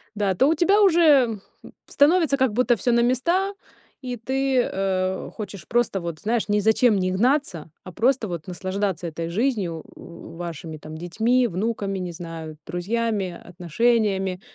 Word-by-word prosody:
Да, 200 -2 0
а - - -1
то 265 - +3
у - - +4
тебя 395 +6 +3
уже, 300 - +4 0.2
м, - - -12 0.2
становится 305 0 +3
как 260 -5 +1
будто 240 +1 +3
всё 245 +3 0
на 235 - +3
места, 340 +11 +1 0.5
и 250 -2 -5
ты, 265 +2 0
э, 190 -2 -2
хочешь 200 -6 -8
просто 240 -5 +1
вот, 170 -2 -5
знаешь, 225 +3 -1
ни 210 0 +2
зачем 220 +1 +3
не 185 -1 0
гнаться, 210 - 0
а 185 - -9
просто 235 +3 +1
вот 170 -4 -6
наслаждаться 185 0 -3
этой 165 +1 -5
жизнью, 195 - -1
в 170 -1 -12
вашими 165 -2 -6
там 155 +1 -10
детьми, 230 +9 +1
внуками, 195 0 -2
не 180 -1 -4
знаю, 165 -2 -8
друзьями, 200 0 -2
отношениями, 190 +1 0
205 Hz, 160 wpm, -23 LUFS, 175-250 Hz, 0.5 s, у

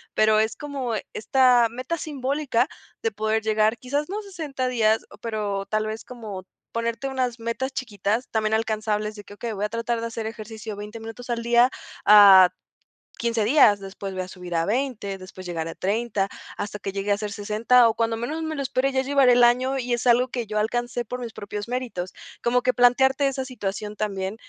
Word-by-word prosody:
pero 215 0 +4
es 220 0 -1
como 275 -5 -4 0.2
esta 250 0 +4
meta 255 +8 -4
simbólica 275 -4 -1 0.4
de 455 - +1
poder 220 - 0
llegar, 215 +1 +2
quizás 285 +6 -2
no 400 - -3
a - - -8
60 310 -10 -4
días, 225 -3 +2
o - - -13
pero, 210 -3 -3
tal 215 0 0
vez 220 +1 -5
como 215 -7 -8 0.3
ponerte 230 +3 -2
unas 255 -3 -2
metas 230 +4 -3
chiquitas, 225 -2 -2
también 220 -1 0
alcanzables 215 -1 -1
de 205 - -10
que: 205 - -13
"Okey, 230 +2 -4
voy 205 0 -2
a - - -3
tratar 230 +1 -2
de 230 - -2
hacer 225 -1 -5
ejercicio 220 -1 -7
20 210 +2 -8
minutos 225 +2 -9
al 235 -1 -1
día, 240 +1 +5 0.4
a 200 -3 +9 0.7
15 230 -2 0
días, 225 -5 +5
después 195 0 -7
voy 185 0 -3
a - - -9
subir 180 -2 -7
a 165 0 +2
20, 220 -3 -2
después 185 0 -11
llegar 165 -2 -3
a - - -7
30, 205 0 -1 0.3
hasta 210 0 -4
que 195 - -4
llegue 200 +1 -2
a - - -1
ser 210 0 -4
60, 220 +4 +3
o 225 - +2
cuando 225 0 0
menos 300 +8 -3
me 315 0 -3
lo 280 - -3
espere, 270 0 0
ya 265 0 +1
llevaré 270 -2 +4
el 245 0 +5
año 255 +3 +2
y 245 -1 -2
es 240 +1 -1
algo 245 +1 +5
que 245 -3 -4
yo 210 0 -1
alcancé 240 +2 -1
por 250 +3 -5
mis 235 -2 -5
propios 205 0 -6
méritos". 245 -8 -4 0.3
Como 245 +1 +2
que 255 +1 +2
plantearte 265 +3 +4
esa 265 -1 -2
situación 210 -4 -5
también 195 -1 -3
230 Hz, 205 wpm, -24 LUFS, 210-250 Hz, 0.7 s, a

